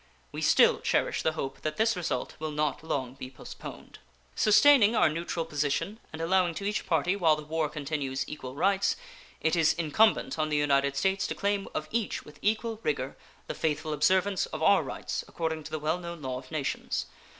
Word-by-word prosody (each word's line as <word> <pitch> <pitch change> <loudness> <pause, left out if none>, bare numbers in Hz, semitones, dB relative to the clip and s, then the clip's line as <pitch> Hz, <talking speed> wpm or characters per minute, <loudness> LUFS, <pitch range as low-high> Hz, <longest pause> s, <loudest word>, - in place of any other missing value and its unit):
We - - -5
still - - +5
cherish - - 0
the 160 - +1
hope 135 -3 -5
that 155 0 -3
this 225 0 +3
result 175 -2 -2
will 155 0 -3
not 150 0 -1
long 130 -5 -2
be 130 -1 -8
postponed. 130 - -10 0.4
Sustaining 225 +1 +6
our 215 - +5
neutral 165 +1 -3
position 150 +7 -1
and 160 - -8
allowing 175 0 +2
to 200 - -5
each 210 +1 -2
party 170 +3 +2
while 165 -6 +4
the 150 - -7
war 155 0 -1
continues 140 -3 -3
equal 130 -4 -7
rights, 195 +5 +2 0.5
it 160 +2 +2
is 165 -2 +4
incumbent 170 +3 +2
on 155 0 +1
the 150 - +1
United 140 -1 +2
States 190 +6 +1
to - - -3
claim 200 0 -1
of 155 - -2
each 230 -2 -2
with 150 - -14
equal 220 +1 0
rigor 135 - -2 0.3
the - - -4
faithful 155 0 -1
observance 190 +5 +2
of - - -5
our - - +6
rights - - -4
according 160 -2 -3
to - - -6
the 155 - -3
well 155 +3 -1
known 170 -3 -7
law 130 -1 -3
of 130 - -14
nations. 155 -4 -2
160 Hz, 195 wpm, -29 LUFS, 150-190 Hz, 0.5 s, Sustaining